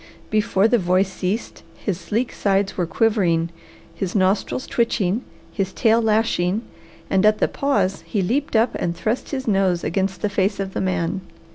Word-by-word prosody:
Before 215 -1 +3
the 240 +1 +3
voice 185 +1 +1
ceased, 195 +5 -3
his 190 -4 -3
sleek 230 +6 -2
sides 195 -1 +1
were 175 -3 -1
quivering, 170 -6 +1 0.4
his 180 +3 -4
nostrils 195 +6 +1
twitching, 225 -2 0 0.3
his 195 -2 -2
tail 225 +1 +3
lashing, 215 -2 +1 0.4
and 190 0 +2
at 215 0 +5
the - - +2
pause 200 -9 0
he 200 -4 0
leaped 260 +8 -1
up 225 +2 +3
and 170 0 -1
thrust 225 +3 -2
his 265 -3 -4
nose 195 -4 +2
against 190 +2 -1
the - - +3
face 200 +1 0
of 195 -1 -3
the - - -2
man. 185 0 -1
195 Hz, 165 wpm, -22 LUFS, 185-220 Hz, 0.4 s, at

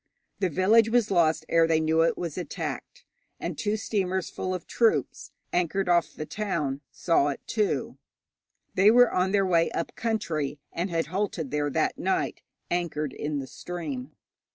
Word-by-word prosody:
The 190 -2 +1
village 210 +7 +4
was 235 -2 +2
lost 165 -4 +3
ere 165 -1 +4
they 160 -1 +3
knew 160 +1 +2
it 165 - +2
was 170 -4 -4
attacked. 485 - -5 0.3
And - - -4
two 210 0 -1
steamers 190 -4 -1
full 185 - -3
of 185 -2 -4
troops, 230 -2 +1 0.2
anchored 180 +2 +1
off 175 -2 +2
the 155 - -5
town, 150 -9 -2
saw 165 -5 +2
it, 140 - -2
too. 210 -3 -1 0.7
They 195 +3 +6
were 245 +2 +6
on 185 +1 +1
their 200 -1 +3
way 170 -3 +3
up 165 - -3
country, 165 -11 -2 0.2
and 175 +3 -2
had 165 -1 0
halted 185 -7 -2
there 145 0 0
that - - 0
night, - - -1 0.3
anchored 155 -5 -1
in 150 0 -3
the 135 - -3
stream. 150 -4 -6
175 Hz, 165 wpm, -27 LUFS, 155-200 Hz, 0.7 s, They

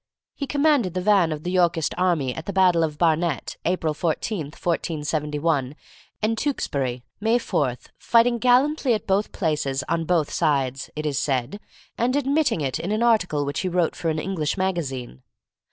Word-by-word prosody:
He 280 - -5
commanded 285 - +2
the 185 - 0
van 190 -4 +3
of 155 0 -4
the 180 - -2
Yorkist 170 -4 +2
army 170 -8 +1
at 160 +5 -8
the 200 - -3
battle 180 -3 +4
of 150 -2 -2
Barnet, 165 -2 0
April 165 -3 0
14, 165 +3 -2
1471, 150 -3 -2 0.5
and 225 +1 +2
Tewkesbury, 135 - -2 0.2
May 225 +3 +2
4, 135 - 0 0.2
fighting 235 0 +3
gallantly 255 +1 +3
at 210 - -5
both 200 +2 +1
places 145 -6 -1
on 165 -1 0
both 165 -3 +1
sides, 135 -5 0
it 155 0 -4
is 145 -3 0
said, 135 +8 -1 0.4
and 250 +3 +1
admitting 280 - +1
it 135 -3 -2
in 185 - -3
an 215 +2 +1
article 185 -11 +2
which 140 0 -3
he 185 - -1
wrote 175 -2 +1
for 165 - -2
an 155 - -1
English 160 -1 -2
magazine. 140 - -3
170 Hz, 170 wpm, -24 LUFS, 150-210 Hz, 0.5 s, battle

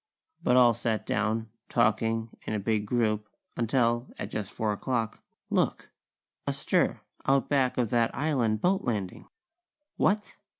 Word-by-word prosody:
But 125 - +4
all 120 -2 +7
sat 110 -1 -2
down, 110 +2 -1 0.2
talking 115 -1 +1 0.2
in - - -1
a - - 0
big 105 0 0
group, 110 -2 0 0.3
until, 120 0 +1
at - - -5
just 105 -2 -4
four 110 -1 -1
o'clock, 115 0 -2 0.3
look! - - 0 0.6
A - - +1
stir, - - +1 0.3
out 135 0 +3
back 135 -3 +2
of 120 -4 +1
that 115 -1 +3
island 125 -8 +1
boat 190 +2 +2
landing! 105 -7 -3 0.7
What? 210 +2 +1
115 Hz, 140 wpm, -28 LUFS, 110-125 Hz, 0.7 s, all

